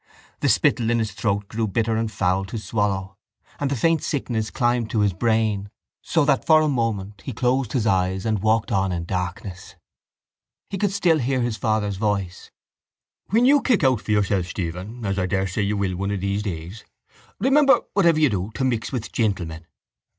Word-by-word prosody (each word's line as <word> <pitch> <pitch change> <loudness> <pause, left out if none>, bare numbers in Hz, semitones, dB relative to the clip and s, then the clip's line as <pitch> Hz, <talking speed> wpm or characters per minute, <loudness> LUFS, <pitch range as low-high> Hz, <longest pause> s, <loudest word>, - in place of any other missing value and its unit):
The - - +1
spittle 115 -2 +2
in 120 - +2
his 110 -2 -1
throat 100 -1 -1
grew 110 +1 -2
bitter 110 +3 0
and 110 0 -1
foul 95 -2 0
to 105 +4 -6
swallow 100 -2 -2 0.4
and 140 - 0
the 140 - 0
faint 165 +5 +2
sickness 115 -6 -2
climbed 120 -2 0
to 110 - 0
his 100 -2 +2
brain 110 -1 0 0.3
so 160 -3 +1
that 140 -2 +2
for 155 -1 +6
a 155 - +2
moment 110 -7 -2
he - - -5
closed 125 0 0
his 120 -4 0
eyes 95 -1 +1
and 110 -3 0
walked 110 +1 +1
on 95 -1 +1
in 85 -1 -3
darkness. 90 +1 -5 1.0
He 195 - -3
could 205 -1 +1
still 175 -5 +2
hear 130 0 0
his 120 -2 -1
father's 110 -3 -1
voice— 100 -4 -2 0.8
—When 230 +4 +3
you 280 +2 +5
kick 240 -10 +2
out 130 -5 +3
for - - -13
yourself, 100 -4 +1
Stephen—as 95 +4 -4
I 90 - 0
daresay 95 +1 -1
you 100 +1 0
will 95 -2 -1
one 100 +2 -2
of 100 -2 -2
these 100 +1 -1
days—remember, 110 - 0
whatever 170 -5 +4
you 150 -5 +4
do, 95 0 -2
to - - -2
mix 120 -4 -1
with 125 -4 -4
gentlemen. 85 -7 -2
110 Hz, 185 wpm, -23 LUFS, 95-125 Hz, 1.0 s, for